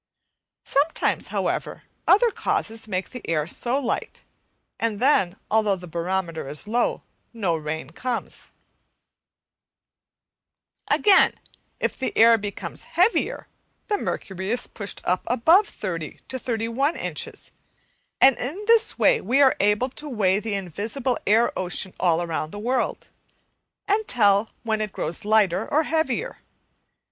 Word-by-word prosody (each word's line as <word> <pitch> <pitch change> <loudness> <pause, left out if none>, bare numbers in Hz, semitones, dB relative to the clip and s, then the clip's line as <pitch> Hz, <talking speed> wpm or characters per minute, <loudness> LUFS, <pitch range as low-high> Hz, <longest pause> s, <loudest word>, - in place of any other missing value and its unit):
Sometimes, 290 +4 +1
however, - - -3 0.2
other 450 +4 +5
causes 225 - -2
make 185 -2 -3
the 250 - -7
air 155 -2 +1 0.2
light, 250 +1 -2 0.6
and 225 -3 -1
then, 195 -9 +3 0.2
although 215 -2 +3
the 180 -1 -10
barometer 170 -2 -3
is 150 +7 -4
low, 240 +3 0 0.3
no 195 -8 0
rain 155 -2 -5
comes, 245 +6 -4 2.4
Again, 400 -3 +5 0.4
if - - -2
the 260 - -3
air 230 0 +7
becomes 205 -1 -5
heavier 370 +7 +2 0.4
the 415 - +2
mercury 190 0 -4
is 245 +2 -1
pushed 200 -3 -7
up 180 +1 +1
above 325 - +4
30 165 -6 -5
to 260 - -4
31 235 +6 -1
inches, 465 -3 -4 0.7
and 265 -1 +7
in 310 +12 -4
this 455 0 +3
way 480 -2 +4
we 265 +3 +1
are 270 -2 +6
able 210 +5 +2
to 295 +3 -6
weigh 200 -6 +2
the 215 -1 -3
invisible 215 - -2
air 225 +4 +4
ocean 185 0 -1
all 170 -2 +3
over 165 -2 -2
the 180 - -9
world, 245 +4 -1 0.8
and 420 +1 +1
tell 205 -2 +3
when 220 -2 -1
it 210 -2 -3
grows 170 +8 -3
lighter 210 -2 +2
or 310 +2 +3
heavier. 320 - -1
225 Hz, 130 wpm, -24 LUFS, 190-270 Hz, 2.4 s, air